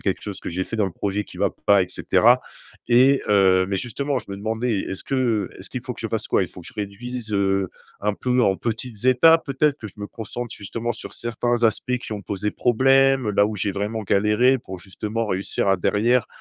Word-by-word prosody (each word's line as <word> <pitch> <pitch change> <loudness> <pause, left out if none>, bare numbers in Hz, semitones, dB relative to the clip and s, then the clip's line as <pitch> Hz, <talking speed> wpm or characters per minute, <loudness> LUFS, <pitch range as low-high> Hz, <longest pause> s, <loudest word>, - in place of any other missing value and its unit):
quelque 95 - -2
chose 100 -2 -6
que - - -7
j’ai 90 +2 -2
fait 110 - -5
dans 105 -3 +2
le 90 - -5
projet 100 0 -2
qui - - -13
va - - +2 0.2
pas, 100 -2 +6
et 90 - -4
cetera. - - +3 0.5
Et 130 +3 +5
heu, 95 -2 +4
mais 100 - 0
justement 135 +6 -2
je - - -17
me 100 - -5
demandais 110 +1 -1
est-ce 95 - -5
que, - - -3
heu, 115 -6 0
est-ce - - -9
qu’il - - -5
faut - - -4
que - - -11
je - - -3
fasse - - -3
quoi? - - +3
Il - - -9
faut 90 - -12
que - - -12
je 125 - -15
réduise, 110 +3 -6
heu, 95 -2 +1 0.3
un 105 0 0
peu 125 +3 0
en 95 -3 +3
petites 115 0 -4
étapes 160 +6 +6
peut-être? 140 +1 +1
Que 110 - -7
je - - -17
me 105 0 -6
concentre 115 +2 -6
justement 115 +4 -4
sur 110 - -9
certains 120 +1 -1
aspects 125 +3 +1
qui 110 - -8
ont 105 -1 -5
posé 105 +2 -3
problème, 135 0 +3
là 100 0 +3
où 105 0 -2
j’ai 100 +1 -1
vraiment 105 +3 -3
galéré, 105 +7 +3
pour 95 -4 -9
justement 105 +5 -4
réussir 95 0 -1
à 95 - +4
derrière, 115 +7 +2
110 Hz, 235 wpm, -23 LUFS, 100-125 Hz, 0.5 s, pas